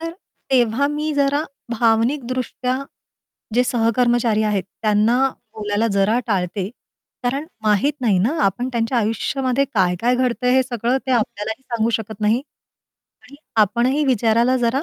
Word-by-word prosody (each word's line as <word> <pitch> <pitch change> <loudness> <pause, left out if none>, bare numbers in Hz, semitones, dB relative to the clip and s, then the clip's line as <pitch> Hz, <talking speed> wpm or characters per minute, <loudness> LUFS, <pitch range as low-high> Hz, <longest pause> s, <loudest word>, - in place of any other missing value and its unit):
तर 330 0 -4 0.4
तेव्हा 250 +1 +3
मी 300 +1 -2
जरा 285 +1 +2 0.3
भावनिक 235 +4 +2
दृष्ट्या 255 0 -2 0.8
जे 250 +1 +4
सहकर्मचारी 235 -1 +2
आहेत, 205 -3 0 0.2
त्यांना 225 +5 +3 0.3
बोलायला 210 +1 -1
जरा 200 +4 +3
टाळते. 190 -1 -1 0.6
कारण 275 +5 -1 0.2
माहीत 215 +8 +3
नाही 215 -7 +2
ना, 220 +10 +1
आपण 195 +6 0
त्यांच्या 235 +1 0
आयुष्यामध्ये 255 +4 0
काय-काय 190 +5 +2
घडतंय 250 0 +1
हे 260 - +5
सगळं 245 0 -1
ते 260 - -2
आपल्यालाही 220 0 -2
सांगू 235 -3 -1
शकत 220 -1 -8
नाही. 220 +5 +2 0.8
आणि 265 +3 -15 0.3
आपणही 240 +8 +1
विचारायला 240 0 +2
जरा 250 +3 0
235 Hz, 135 wpm, -20 LUFS, 215-255 Hz, 0.8 s, हे